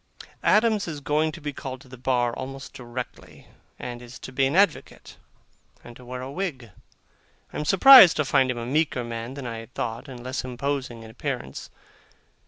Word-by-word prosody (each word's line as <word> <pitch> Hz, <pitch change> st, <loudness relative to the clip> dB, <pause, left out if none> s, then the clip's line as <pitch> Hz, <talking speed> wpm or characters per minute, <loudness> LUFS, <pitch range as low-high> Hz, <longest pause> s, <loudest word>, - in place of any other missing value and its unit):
Adams 215 Hz, -2 st, +3 dB
is 155 Hz, -3 st, -5 dB
going 150 Hz, +2 st, 0 dB
to 170 Hz, -, -10 dB
be 145 Hz, -2 st, -5 dB
called 130 Hz, -1 st, -7 dB
to 140 Hz, -, -17 dB
the 130 Hz, -, -11 dB
bar 125 Hz, -1 st, 0 dB
almost 135 Hz, +2 st, -7 dB
directly, 125 Hz, 0 st, -8 dB, 0.3 s
and 120 Hz, -1 st, -7 dB
is 125 Hz, +1 st, -11 dB
to -, -, -9 dB
be 135 Hz, +1 st, +2 dB
an 140 Hz, -, -2 dB
advocate, 200 Hz, +2 st, 0 dB, 0.7 s
and 120 Hz, -, -12 dB
to 125 Hz, -, -14 dB
wear 125 Hz, +1 st, -7 dB
a 130 Hz, -, -6 dB
wig. 140 Hz, -, -5 dB, 0.8 s
I -, -, -5 dB
am 150 Hz, -, -3 dB
surprised 195 Hz, -, +9 dB
to 150 Hz, -, +1 dB
find 135 Hz, -1 st, +3 dB
him 125 Hz, -, -2 dB
a 115 Hz, -, -4 dB
meeker 140 Hz, -1 st, 0 dB
man 115 Hz, +2 st, -6 dB
than 140 Hz, -2 st, -7 dB
I 115 Hz, -2 st, -5 dB
had 115 Hz, +2 st, -13 dB
thought, 115 Hz, +5 st, -4 dB
and 125 Hz, -3 st, -9 dB
less 130 Hz, +1 st, -3 dB
imposing 130 Hz, -2 st, -4 dB
in 110 Hz, -, -11 dB
appearance. 65 Hz, -10 st, -5 dB
130 Hz, 190 wpm, -25 LUFS, 120-150 Hz, 0.8 s, surprised